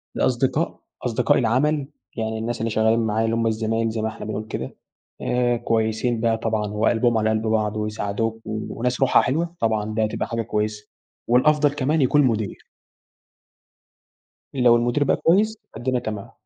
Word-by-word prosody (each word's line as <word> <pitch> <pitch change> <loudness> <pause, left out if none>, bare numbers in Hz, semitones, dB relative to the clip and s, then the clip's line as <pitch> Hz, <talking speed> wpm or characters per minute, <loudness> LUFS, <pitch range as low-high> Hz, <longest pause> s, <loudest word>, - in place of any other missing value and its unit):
الأصدقاء - - 0 0.3
أصدقاء - - +2
العمل 140 +5 +1 0.3
يعني 110 0 -2
الناس 115 +1 -3
اللي 115 +1 -1
شغالين 110 +1 +2
معايا 110 0 0
اللي 115 0 0
هُم 115 0 +1
الزمايل 115 +1 0
زي 110 0 -3
ما 110 - 0
إحنا 110 - -7
بنقول 110 0 -4
كده 65 -11 -5 0.5
آآ، 120 -1 +1
كويسين 115 0 0
بقى 115 -1 +2
طبعًا 110 -1 -1
وقلبهم 115 +2 +2
على 110 0 +1
قلب 110 0 0
بعض، 110 -1 0
ويساعدوك، 105 +1 -2
وناس 115 +4 -3
روحها 135 - +5
حلوة، 165 +7 -1
طبعًا 110 -1 0
ده 110 0 +1
تبقى - - -3
حاجة 115 0 -2
كويسة 105 -1 -3 0.4
والأفضل 145 +4 +4
كمان 145 +2 +1
يكون 140 +3 +4
المدير. 110 -7 -1 1.9
لو 125 -3 +5
المدير 120 +4 +1
بقى - - +2
كويس، 210 +6 +2 0.2
فالدنيا 125 0 -1
تمام. 105 -4 -6
115 Hz, 155 wpm, -23 LUFS, 110-125 Hz, 1.9 s, روحها